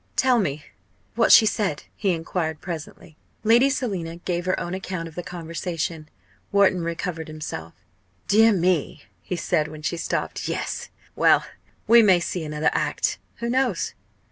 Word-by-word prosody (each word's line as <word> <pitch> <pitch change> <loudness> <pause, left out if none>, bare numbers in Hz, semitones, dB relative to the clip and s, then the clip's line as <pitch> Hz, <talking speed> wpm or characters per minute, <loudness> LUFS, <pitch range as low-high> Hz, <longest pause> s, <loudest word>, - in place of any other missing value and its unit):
"Tell 255 -2 +4
me 150 -6 -2 0.5
what 230 0 +3
she 220 - +9
said," 195 -8 -1
he 200 - -1
enquired 165 -2 -2
presently. 160 -1 -8 0.3
Lady 235 +5 +5
Selina 195 - -2
gave 175 0 -3
her 185 - +1
own 175 - -4
account 185 -3 -4
of 165 - -11
the 175 - -4
conversation. 165 -2 -4 0.4
Wharton 200 -3 +4
recovered 165 -1 -4
himself. 150 - -7 0.5
"Dear 225 +2 +6
me!" 180 -5 0 0.2
he 180 - -4
said, 165 -3 0
when 155 0 -10
she 170 +3 -1
stopped. - - -3
"Yes - - -3 0.3
well - - +4 0.4
we 235 +1 +7
may 190 -5 +5
see 175 0 -3
another 150 0 0
act. - - 0 0.2
Who 235 0 -4
knows? 255 -8 0
175 Hz, 150 wpm, -24 LUFS, 160-200 Hz, 0.5 s, she